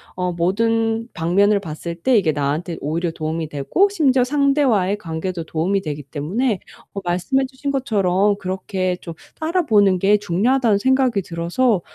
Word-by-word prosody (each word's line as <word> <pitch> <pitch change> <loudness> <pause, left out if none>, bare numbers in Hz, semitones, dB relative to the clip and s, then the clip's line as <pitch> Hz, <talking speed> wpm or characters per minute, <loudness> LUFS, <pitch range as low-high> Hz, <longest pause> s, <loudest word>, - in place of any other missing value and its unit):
어 180 -1 -2
모든 225 +6 0
방면을 200 +5 +2
봤을 170 0 -6
때 235 +7 +2
이게 160 -6 +2
나한테 150 +4 -2
오히려 165 +3 -2
도움이 160 0 -3
되고 150 - +2
심지어 270 -10 +2
상대와의 270 -8 +2
관계도 170 -2 -5
도움이 180 +6 0
되기 150 -3 -5
때문에 185 - -2 0.3
어 200 - -4
말씀해 185 +10 0
주신 265 +2 -5
것처럼 205 -6 +1
그렇게 185 -1 -2
좀 170 - -7 0.3
따라 335 +3 +1
보는 205 -5 +4
게 205 +2 +4
중요하다는 215 +4 +2
생각이 260 -4 +2
들어서 175 +5 0
195 Hz, 345 characters per minute, -20 LUFS, 170-240 Hz, 0.3 s, 보는